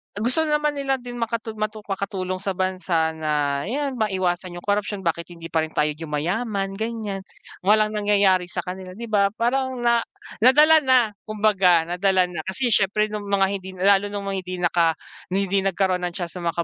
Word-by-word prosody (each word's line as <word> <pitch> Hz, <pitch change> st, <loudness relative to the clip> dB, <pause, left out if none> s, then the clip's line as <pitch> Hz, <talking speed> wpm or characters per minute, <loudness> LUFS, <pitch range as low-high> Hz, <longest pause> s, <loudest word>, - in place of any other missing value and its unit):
gusto 255 Hz, +10 st, +2 dB
naman 300 Hz, 0 st, +1 dB
nila 270 Hz, -1 st, +1 dB
din 245 Hz, -1 st, -8 dB
makatu 230 Hz, -1 st, -2 dB
matu 215 Hz, 0 st, -3 dB
makatulong 190 Hz, -2 st, -3 dB
sa 195 Hz, 0 st, -3 dB
bansa 185 Hz, -3 st, 0 dB
na 150 Hz, -3 st, -1 dB
yan 270 Hz, +1 st, -2 dB
maiwasan 185 Hz, -4 st, -1 dB
yung 175 Hz, -, -8 dB
corruption, 205 Hz, -1 st, -1 dB
bakit 170 Hz, 0 st, -1 dB
hindi 170 Hz, -1 st, -10 dB
pa 165 Hz, -, +2 dB
rin 160 Hz, 0 st, -3 dB
tayo 150 Hz, 0 st, +2 dB
yumayaman 180 Hz, +7 st, -2 dB
ganyan, 215 Hz, -1 st, -4 dB, 0.4 s
walang 215 Hz, +2 st, +3 dB
nangyayari 200 Hz, -3 st, +2 dB
sa -, -, -4 dB
kanila 185 Hz, 0 st, -7 dB
di 230 Hz, +1 st, -8 dB
ba 200 Hz, -2 st, +4 dB
parang 260 Hz, +3 st, 0 dB
na 235 Hz, 0 st, +4 dB, 0.4 s
nadala 300 Hz, +7 st, +6 dB
na 255 Hz, -6 st, +3 dB, 0.2 s
kumbaga 200 Hz, -5 st, +3 dB
nadala 180 Hz, +1 st, +1 dB
na. 170 Hz, -, -5 dB
Kasi 240 Hz, +6 st, -1 dB
siyempre 210 Hz, +1 st, +2 dB
nung 210 Hz, -1 st, -5 dB
mga 200 Hz, -1 st, +3 dB
hindi 190 Hz, 0 st, -10 dB
lalo 195 Hz, +2 st, +3 dB
nung 205 Hz, 0 st, -5 dB
mga 195 Hz, -, -2 dB
hindi 185 Hz, 0 st, -6 dB
naka 170 Hz, -2 st, +3 dB, 0.3 s
hindi 195 Hz, +1 st, 0 dB
nagkaroon 190 Hz, -1 st, 0 dB
ng 175 Hz, -, -8 dB
chance 175 Hz, -1 st, -5 dB
na 170 Hz, -, -3 dB
siya 165 Hz, -, -1 dB
sa 170 Hz, -, 0 dB
195 Hz, 185 wpm, -23 LUFS, 180-220 Hz, 0.4 s, nadala